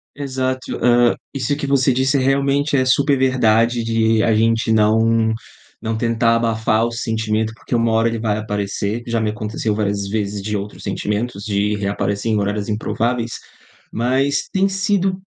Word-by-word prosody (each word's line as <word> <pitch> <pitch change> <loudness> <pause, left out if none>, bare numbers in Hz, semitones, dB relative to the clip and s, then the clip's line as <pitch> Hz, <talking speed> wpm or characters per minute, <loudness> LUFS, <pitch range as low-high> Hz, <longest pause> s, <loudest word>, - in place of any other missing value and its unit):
Exato, 130 -2 -3
ah, 120 0 +4 0.2
isso 135 +1 -1
que 140 -1 -4
você 135 -2 +3
disse, 135 +2 +1
realmente, 140 +2 +1
é 130 -1 +2
super 140 +2 +3
verdade 120 -2 +2
de 115 -1 +2
a 115 - +3
gente 115 +1 +2
não 110 +1 +3 0.5
não 115 0 -3
tentar 115 0 +2
abafar 115 0 +1
o - - -5
sentimento, 110 -2 -1
porque 120 - -4
uma 115 -1 +2
hora 115 +1 +3
ele 115 0 -1
vai 110 -2 -1
aparecer, 105 +1 -3
já 115 -1 -1
me 110 - 0
aconteceu 105 0 -3
várias 100 -1 -1
vezes 105 -1 -2
de 105 +1 -2
outros 100 +1 -7
sentimentos 105 0 -3
de 105 -1 0
reaparecer 100 +2 -2
em - - +2
horários 100 0 -2
improváveis, 115 +2 -1 0.6
mas, 130 +4 0
tem 195 0 +2
sido 195 -1 0
115 Hz, 160 wpm, -19 LUFS, 110-130 Hz, 0.6 s, ah